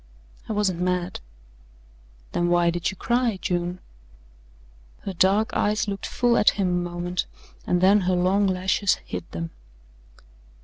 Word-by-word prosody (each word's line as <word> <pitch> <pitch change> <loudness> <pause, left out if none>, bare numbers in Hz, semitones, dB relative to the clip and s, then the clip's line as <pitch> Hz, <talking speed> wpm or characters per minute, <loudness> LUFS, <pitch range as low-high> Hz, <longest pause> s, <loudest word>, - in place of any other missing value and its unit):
"I - - -1
wasn't 200 -4 0
mad." 180 0 -1 1.1
"Then 175 - 0
why 175 -1 +3
did 175 0 -1
you 190 - -7
cry, 240 -3 +1
June?" 175 0 -2 1.2
Her 195 - -5
dark 195 +5 +3
eyes 210 +1 +1
looked 200 -1 -4
full 240 -1 +2
at - - +6
him 195 -3 +1
a 175 0 -1
moment 175 +1 -3 0.4
and 180 0 +2
then 195 +3 +6
her 185 0 +1
long 190 +3 +2
lashes 190 +1 +1
hid 90 - -6
them. 85 0 -5
185 Hz, 140 wpm, -24 LUFS, 175-200 Hz, 1.2 s, at